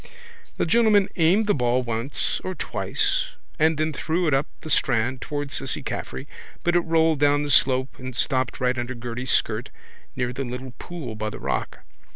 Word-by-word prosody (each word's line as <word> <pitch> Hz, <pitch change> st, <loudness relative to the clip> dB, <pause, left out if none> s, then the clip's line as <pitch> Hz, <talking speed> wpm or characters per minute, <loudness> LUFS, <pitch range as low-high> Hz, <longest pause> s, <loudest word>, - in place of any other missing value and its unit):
The -, -, +1 dB
gentleman 210 Hz, 0 st, +4 dB
aimed 180 Hz, +6 st, +4 dB
the 205 Hz, -, +3 dB
ball 125 Hz, -1 st, +1 dB
once 115 Hz, +3 st, -2 dB
or 185 Hz, -, -3 dB
twice -, -, 0 dB, 0.3 s
and 160 Hz, 0 st, +4 dB
then 155 Hz, 0 st, 0 dB
threw 170 Hz, +5 st, 0 dB
it 150 Hz, -, +2 dB
up 135 Hz, +3 st, +2 dB
the 155 Hz, -, -7 dB
strand 125 Hz, -1 st, +2 dB
towards 145 Hz, -1 st, -4 dB
Cissy 135 Hz, -, -1 dB
Caffrey 65 Hz, -, -5 dB, 0.4 s
but 175 Hz, 0 st, +2 dB
it -, -, +6 dB
rolled 160 Hz, -2 st, +2 dB
down 145 Hz, 0 st, +4 dB
the 145 Hz, -, -2 dB
slope 130 Hz, 0 st, +3 dB
and 130 Hz, -1 st, -6 dB
stopped 130 Hz, 0 st, 0 dB
right 125 Hz, 0 st, +1 dB
under 120 Hz, +2 st, -3 dB
Gerty's 120 Hz, +2 st, -5 dB
skirt -, -, +1 dB, 0.5 s
near 125 Hz, -1 st, -1 dB
the 135 Hz, +2 st, -3 dB
little 125 Hz, 0 st, -6 dB
pool 160 Hz, -10 st, -6 dB
by 110 Hz, 0 st, -3 dB
the -, -, -7 dB
rock. -, -, -3 dB
135 Hz, 185 wpm, -24 LUFS, 125-160 Hz, 0.5 s, it